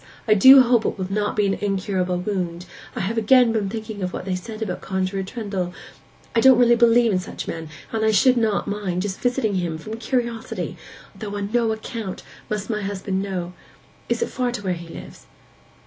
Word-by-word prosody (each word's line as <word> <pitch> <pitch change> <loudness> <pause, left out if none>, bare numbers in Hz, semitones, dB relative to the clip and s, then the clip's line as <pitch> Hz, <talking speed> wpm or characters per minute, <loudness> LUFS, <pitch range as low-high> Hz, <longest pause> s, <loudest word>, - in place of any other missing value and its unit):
I 215 - +6
do 260 +6 +9
hope 240 -2 +3
it - - -2
will 190 0 -4
not 210 0 0
be 210 - +2
an 195 - +1
incurable 190 -3 -1
wound. 180 -2 -3 0.3
I - - -2
have 220 +5 -1
again 240 +2 +5
been 215 -3 -1
thinking 220 -1 -6
of 180 -1 -3
what - - -5
they 190 - -2
said 215 +4 -5
about 180 -4 -4
Conjuror 190 0 -2
Trendle. 190 -3 -4 0.6
I - - +5
don't 260 +1 +7
really 240 -1 +5
believe 235 -1 +4
in 185 - +1
such 185 - -7
men, 160 -1 -5 0.2
but 220 -1 -1
I 220 - +4
should 235 +5 +4
not 220 -4 +1
mind 195 -3 -2
just 195 -2 -4
visiting 245 -4 +1
him, 170 -3 -2
from 215 +7 -7
curiosity—though 230 -3 -5
on 200 0 -4
no 235 -2 +2
account 220 -2 -5 0.3
must 210 -1 -3
my 215 -2 -2
husband 195 -1 -2
know. 180 -3 -4 0.6
Is - - +1
it - - -3
far 250 -1 -1
to 240 - -5
where 185 -2 0
he 170 -1 -8
lives? - - -11
205 Hz, 200 wpm, -22 LUFS, 190-230 Hz, 0.6 s, do